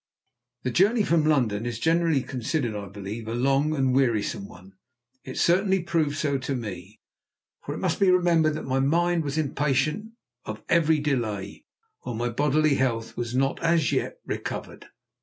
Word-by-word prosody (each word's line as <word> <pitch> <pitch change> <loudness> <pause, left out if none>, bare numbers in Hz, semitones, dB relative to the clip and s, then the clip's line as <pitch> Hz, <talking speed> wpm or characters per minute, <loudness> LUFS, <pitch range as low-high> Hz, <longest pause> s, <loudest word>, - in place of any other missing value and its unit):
The 125 - -1
journey 205 - +3
from 165 -5 +2
London 120 -7 +1
is 120 -2 -3
generally 165 0 +2
considered, 125 -2 -2
I 100 -1 -5
believe, 100 +3 -7
a 115 - -3
long 135 +5 +2
and 135 -3 +1
wearisome 115 -6 +1
one; 95 +2 -15 0.5
it 130 - -8
certainly 190 +2 +3
proved 155 -4 0
so 140 -3 0
to 135 +1 -3
me, 105 -3 -7 0.6
for - - -5
it - - -5
must - - -1
be 195 - +4
remembered 170 -4 +3
that 155 - -5
my 135 0 0
mind 170 +4 +2
was 145 0 -3
impatient 150 - 0 0.3
of 110 0 -7
every 160 -2 +4
delay, 120 -9 -2 0.3
while 120 - -6
my 120 +2 -1
bodily 150 +4 +2
health 115 -4 -1
was 120 0 -4
not 135 +1 0
as 165 -3 +2
yet - - -1
recovered. - - -5
135 Hz, 165 wpm, -26 LUFS, 115-160 Hz, 0.6 s, be